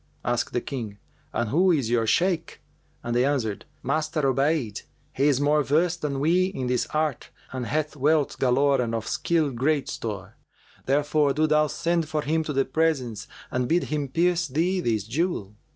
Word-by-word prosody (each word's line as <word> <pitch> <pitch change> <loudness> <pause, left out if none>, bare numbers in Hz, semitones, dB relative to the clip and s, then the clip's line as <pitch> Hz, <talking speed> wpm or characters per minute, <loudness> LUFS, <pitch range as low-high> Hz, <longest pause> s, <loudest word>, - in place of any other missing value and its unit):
Asked 120 0 -1
the 120 - 0
King, 115 -7 -5 0.3
'And 120 -2 -1
who 180 +6 +4
is 135 -9 +1
your 115 -2 +2
Shaykh?'; 170 - +1 0.4
and 120 0 -2
they 120 - +4
answered, 130 -7 -1 0.2
'Master 155 +3 0
Obayd: 135 -4 +1 0.3
he 140 +2 +2
is 140 -3 +3
more 150 +1 +3
versed 165 +5 +1
than 140 -2 -2
we 170 +6 +3
in 185 -9 -4
this 125 -1 0
art 155 -4 -2 0.2
and 130 -2 -4
hath 155 0 -1
wealth 150 +1 +1
galore 135 +1 +3
and 115 -1 -1
of 115 -1 -4
skill 160 -4 +1
great 140 +4 0
store. 105 -2 -6 0.5
Therefore 145 +1 +2
do 155 +3 +2
thou 155 0 +3
send 170 0 -1
for 155 -1 -1
him 160 +2 0
to 155 - -3
the 135 0 +2
presence 135 -7 -1 0.2
and 125 -1 0
bid 175 +2 +3
him 145 -2 -1
pierce 170 +4 +1
thee 170 +7 0
this 110 - 0
jewel.' 115 - -2
145 Hz, 180 wpm, -25 LUFS, 125-160 Hz, 0.5 s, who